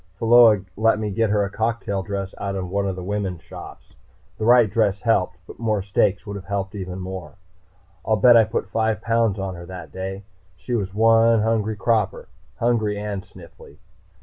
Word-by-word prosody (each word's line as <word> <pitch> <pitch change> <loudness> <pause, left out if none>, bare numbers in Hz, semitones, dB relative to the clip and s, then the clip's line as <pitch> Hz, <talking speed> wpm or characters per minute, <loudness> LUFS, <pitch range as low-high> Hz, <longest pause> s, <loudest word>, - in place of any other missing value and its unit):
Pheola 115 -2 +6
let 110 +1 +3
me 105 -1 -3
get 110 +2 +1
her 105 0 +2
a - - -5
cocktail 110 -3 -2
dress 100 -1 -5
in 95 -2 -3
one 100 0 0
of 95 - -2
the 90 - -7
women's 95 -3 -3
shops. - - -12 0.5
The 110 - -1
right 120 -1 +6
dress 100 -2 0
helped, 90 -7 +1
but - - -13
more 110 -4 0
steaks 100 +1 +1
would 100 -1 -6
have 95 - -10
helped 100 +1 -3
even 95 -3 -6
more. 90 -5 -7 0.7
I'll 110 - +2
bet 120 +4 +6
I 115 -1 +6
put 110 -2 -3
five 110 +2 0
pounds 115 -3 +1
on 95 -1 -4
her 85 -1 -10
that 90 -3 -9
day. 95 +1 -6 0.3
She 125 - -6
was 100 -4 -2
one 115 0 +4
hungry 110 -1 0
'cropper. 110 -1 -1 0.3
Hungry 110 -3 0
and 105 -1 -4
sniffly. 85 -5 -15
105 Hz, 185 wpm, -22 LUFS, 95-115 Hz, 0.7 s, Pheola